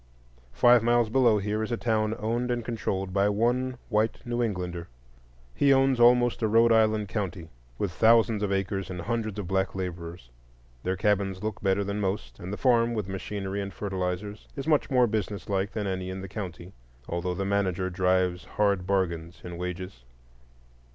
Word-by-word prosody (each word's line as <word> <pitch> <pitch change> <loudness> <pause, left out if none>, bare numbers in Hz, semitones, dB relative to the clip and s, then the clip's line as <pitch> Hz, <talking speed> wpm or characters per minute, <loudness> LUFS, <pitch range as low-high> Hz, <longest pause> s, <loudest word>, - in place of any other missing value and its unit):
Five 120 -1 +6
miles 120 0 +3
below 120 -4 +4
here 105 +2 -1
is 110 - -3
a 120 - 0
town 110 -2 0
owned 120 +2 -1
and 120 -2 -1
controlled 95 -5 -3
by 100 +1 +3
one 120 +4 0
white 110 0 +1
New 120 0 -1
Englander. 90 -6 -3 0.7
He 140 - +3
owns 135 -1 +4
almost 120 0 +5
a 110 - +2
Rhode 115 +2 +4
Island 110 -2 +3
county, 95 -5 -4 0.3
with 100 - -1
thousands 115 +2 +4
of 105 -1 -1
acres 95 0 -1
and 90 -1 -5
hundreds 110 0 -2
of 105 - -3
black 95 0 0
laborers. 85 -6 -6 0.5
Their 95 +5 -2
cabins 100 -1 0
look 110 -1 -3
better 100 0 +1
than 100 +1 -3
most, 95 -12 -3
and 90 +2 -6
the 105 - -4
farm, 120 -2 +3
with 105 -4 -2
machinery 95 +1 -4
and 100 0 -5
fertilizers, 95 +1 -4
is 135 - -5
much 155 -2 +2
more 125 -2 +4
business 105 -3 -3
like 100 0 0
than 105 -2 -2
any 95 -1 -3
in 95 0 -5
the 95 - -6
county, 90 -2 -7 0.3
although 90 +1 -2
the 95 - -2
manager 95 -2 0
drives 90 -1 +1
hard 100 -1 0
bargains 85 -3 -1
in 90 -1 -7
wages. 90 -6 -6
100 Hz, 180 wpm, -27 LUFS, 95-115 Hz, 0.7 s, Five